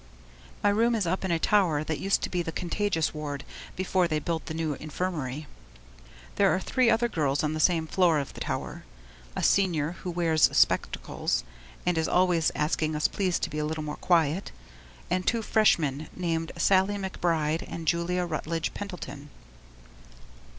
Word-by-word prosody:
My - - +5
room 230 +3 +3
is 210 -4 0
up 185 +4 -1
in 190 - -1
a 170 - +2
tower 165 -5 +2
that 155 0 -3
used 195 +1 +1
to - - -1
be 180 - 0
the 165 - -4
contagious 175 -1 -1
ward 145 -2 -5 0.3
before 185 -1 +1
they 155 -2 0
built 160 +1 -3
the 160 - -4
new 160 -2 -1
infirmary. 155 -2 -4 0.9
There 200 -1 +5
are - - 0
three 250 +4 +2
other 235 +1 +3
girls 145 -9 0
on 155 0 0
the 155 - -3
same 165 0 +3
floor 170 -1 +3
of 140 -2 -3
the - - -9
tower - - -4 0.5
a - - -2
Senior 170 -6 +2
who 180 - -4
wears 165 -3 +3
spectacles - - +1 0.4
and 180 -2 +2
is 160 - 0
always 180 -3 +3
asking 155 0 0
us 150 - +2
please 185 -3 0
to - - -2
be 150 - -3
a - - 0
little 155 0 -3
more 150 0 -5
quiet, 170 +1 +1 0.6
and 185 0 0
two 230 -1 +1
Freshmen 155 -10 +2
named 165 -2 -2
Sallie 195 +1 +3
McBride 165 -5 -1
and 165 -1 -7
Julia 175 +2 +1
Rutledge 165 0 -3
Pendleton. 175 -7 -7
165 Hz, 170 wpm, -27 LUFS, 155-185 Hz, 0.9 s, My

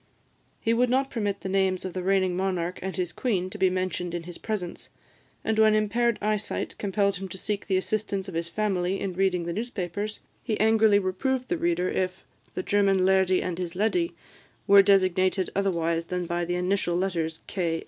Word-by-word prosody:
He 225 - +1
would 245 +1 +2
not 265 +2 +1
permit 205 -4 -2
the - - -5
names 190 -1 +1
of 185 - -4
the 185 - -3
reigning 185 -1 +2
monarch 185 -2 -1
and 190 0 -4
his 175 -2 -2
queen 185 -7 -1
to - - -8
be 190 - +4
mentioned 180 -1 -2
in 170 - -4
his 175 0 -9
presence; 195 -6 -4 0.5
and 220 0 0
when 215 -1 +6
impaired 230 +2 +1
eyesight 215 0 -1
compelled 200 -1 +1
him 190 +1 -6
to 190 - -7
seek 205 +1 -3
the 190 -2 +2
assistance 200 0 -2
of 190 - -7
his 165 0 -2
family 195 -1 0
in 195 -2 -3
reading 180 -1 +1
the 170 - -2
newspapers, 210 -2 -4 0.2
he 220 -4 -2
angrily 220 -1 +5
reproved 250 +7 -1
the 350 - 0
reader 340 - +1
if 185 0 -2 0.3
the 185 - -2
"German 195 -2 +3
lairdie 190 -1 +3
and 180 -1 -3
his 175 -1 -4
leddy" 335 - 0 0.5
were 200 -1 +8
designated 185 -1 +2
otherwise 170 -4 0
than 180 0 -3
by 175 0 -1
the 175 +1 -1
initial 180 -1 0
letters, 170 -3 -1
"K. 170 -4 -1
190 Hz, 190 wpm, -26 LUFS, 180-210 Hz, 0.5 s, were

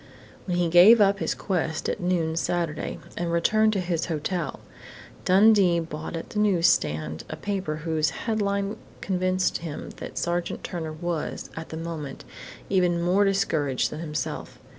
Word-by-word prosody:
When 175 -1 0
he 175 -1 +2
gave 180 +8 +8
up 200 -1 +4
his - - -1
quest 165 -5 -2
at - - -2
noon 175 -3 0
Saturday 165 -2 -2 0.2
and 170 -1 -2
returned 215 +6 +3
to 200 - 0
his 175 -2 -1
hotel, 165 -1 -2 0.7
Dundee 195 -2 +5
bought 160 0 -5
at 165 - -6
the 210 - -2
newsstand 80 - +2
a - - -4
paper 195 -6 -3
whose 155 0 0 0.2
headline 200 -2 0 0.2
convinced 185 -1 0
him 160 -3 -6
that - - -8
Sergeant 175 0 -2
Turner 160 -3 -4
was, 165 0 -4
at 160 0 -7
that 160 - -6
moment, 165 -3 -6 0.4
even 180 -3 +2
more 180 +4 +3
discouraged 160 -9 +1
than 150 - -6
himself. 150 -2 -4
175 Hz, 150 wpm, -26 LUFS, 160-195 Hz, 0.7 s, gave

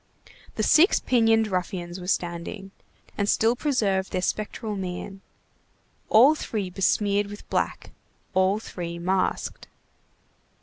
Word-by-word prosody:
The - - -1
six 345 +6 +5
pinioned 225 -3 +3
ruffians 180 -1 -3
were 180 - -8
standing, 180 +2 -3 0.5
and 205 0 +1
still 225 +2 +3
preserved 205 -9 0
their 185 - -2
spectral 215 +1 -3
mien; 190 +1 -6 0.9
all 255 +8 +7
three 210 -10 -4
besmeared 200 +2 +1
with 205 +1 -10
black, - - -2 0.4
all 190 +2 +3
three 170 -5 -6
masked. 185 +2 -1
195 Hz, 115 wpm, -25 LUFS, 185-220 Hz, 0.9 s, all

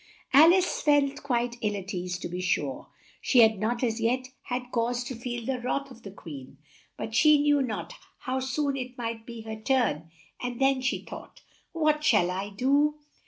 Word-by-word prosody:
Al 310 +5 +9
ice 370 0 +1
felt 285 -1 +2
quite 240 -3 -1
ill 210 -1 0
at 195 +1 -6
ease; 180 0 -3
to - - -5
be 180 +1 -5
sure, 145 -7 -1 0.3
she 250 - +5
had 220 -3 +5
not 235 +4 -1
as 230 -1 0
yet 255 +3 0 0.2
had 250 0 -4
cause 240 +1 0
to 255 +1 -6
feel 240 0 -5
the 260 0 -2
wrath 275 +2 -2
of 240 -2 -13
the 200 - -9
Queen, 145 -8 -10 0.4
but 220 - -5
she 300 +4 +6
knew 290 -1 +3
not 250 - -4 0.3
how 260 0 -2
soon 275 +2 -1
it 255 -1 -6
might 230 -1 -5
be 235 -1 -8
her 220 0 -6
turn; 220 - 0 0.3
"and 245 -1 -4
then," 270 -1 +3
she 255 - -1
thought, - - -10 0.3
"what 305 -2 +1
shall 180 -10 +3
I 195 +2 -3
do?" 280 +8 +2
245 Hz, 195 wpm, -27 LUFS, 220-270 Hz, 0.4 s, Al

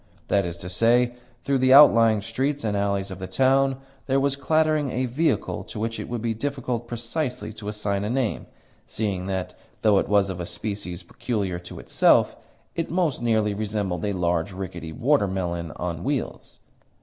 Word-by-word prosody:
That 100 -3 +2
is 85 0 -5
to 85 - -7
say, 120 +6 +3 0.3
through 140 -1 +1
the 130 0 +5
outlying 115 -7 +7
streets 135 +6 -1
and 105 -2 0
alleys 100 -1 -1
of 95 - -7
the 95 - -5
town 135 +6 +3 0.3
there 135 0 +2
was 140 0 +1
clattering 155 0 +1
a 130 +1 -1
vehicle 145 +7 0
to - - -7
which 115 +1 -2
it - - -6
would 120 -2 -4
be 115 -1 0
difficult 125 -1 -3
precisely 120 +1 -3
to 105 -1 -9
assign 105 -1 -2
a 105 - -2
name, 125 -2 -1 0.4
seeing 95 -4 -2
that, 95 -2 -3 0.3
though 105 -3 +5
it - - -2
was 100 -1 +3
of 90 - -6
a 85 - -4
species 100 -4 -5
peculiar 100 -2 -3
to 90 - -10
itself, - - +3 0.4
it 165 - -2
most 170 -8 0
nearly 110 -3 +2
resembled 100 -4 -2
a 100 -1 0
large, 90 0 0
rickety 85 -4 -6
water 125 - +2
melon 85 -3 -3
on 85 -1 -4
wheels. 140 0 -3
110 Hz, 180 wpm, -24 LUFS, 95-130 Hz, 0.4 s, outlying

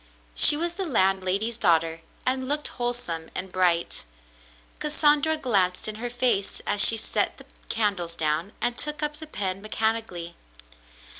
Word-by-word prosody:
She 295 - +9
was 340 +2 -2
the 385 +2 -4
landlady's 195 - 0
daughter 165 -3 +1 0.2
and 260 0 -1
looked 295 +2 +2
wholesome 240 -10 -4
and 185 0 -4
bright. 175 - 0 0.8
Cassandra 300 +1 +2
glanced 195 -11 0
in 215 0 -5
her 245 - -3
face 240 -5 0
as 205 0 +1
she 225 - +7
set - - -1
the - - -14 0.2
candles 200 -7 -1
down, 160 +4 -2
and 240 - 0
took 300 0 -1
up 300 0 -3
the 315 0 -9
pen 195 -8 -4
mechanically. 215 -5 -3
215 Hz, 145 wpm, -25 LUFS, 180-260 Hz, 0.8 s, She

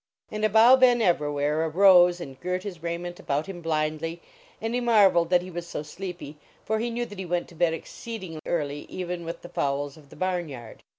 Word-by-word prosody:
And 215 0 -4
Abou 225 +4 +7
Ben 250 -2 +5
Evrawhair 150 -5 +1
arose 180 0 +6
and 135 -6 -9
girt 180 +4 -2
his 180 -6 -7
raiment 170 +1 -4
about 145 +3 -1
him 185 -3 -8
blindly, 155 +1 -2 0.4
and 225 +1 -3
he 245 - 0
mar 215 -5 +5
veled 170 -1 +1
that 180 -1 +3
he 185 - -9
was 175 0 -6
so 150 - -5
sleepy, 170 -2 -8 0.3
for 220 0 0
he 235 +2 -1
knew 240 +1 -2
that 205 -4 -10
he 190 - -4
went 175 0 -1
to 170 - -15
bed 165 -1 +2
exceeding 185 -2 -8
early, 145 -3 -2
even 180 -1 -4
with 165 - -6
the 175 - -9
fowls 140 +1 -2
of 145 -3 -18
the - - -14
barn 180 -3 -2
yard. 120 -5 -10
175 Hz, 215 wpm, -26 LUFS, 155-195 Hz, 0.4 s, Abou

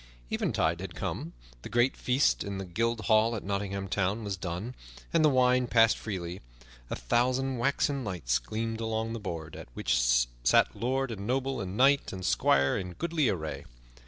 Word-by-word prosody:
Eventide 85 - 0
had 90 -3 -7
come; 80 +2 -4 0.3
the - - -8
great 120 +2 +2
feast 130 +3 +2
in 100 -1 -4
the 95 - -4
Guild 115 +5 -1
Hall 110 +1 +3
at 105 - -5
Nottingham 100 0 -3
Town 100 +3 -1
was 100 -2 -2
done, 90 +6 -5 0.4
and 165 -1 +4
the 155 - +6
wine 125 -1 +3
passed 115 -1 +5
freely. 90 -4 -5 0.5
A - - -2
thousand 125 - 0
waxen 140 +1 +1
lights 85 - -1
gleamed 115 +1 -4
along 110 0 -2
the 115 - -4
board, 80 -6 -6
at - - -9
which - - +1 0.4
sat - - +4
lord 130 +1 -1
and 100 -2 -6
noble 135 +2 -1
and 95 +1 -5
knight 140 +2 +4
and 95 -1 -6
squire 70 +3 +3
in 90 -2 -6
goodly 160 - 0
array. 75 -5 -4
110 Hz, 175 wpm, -29 LUFS, 95-125 Hz, 0.5 s, the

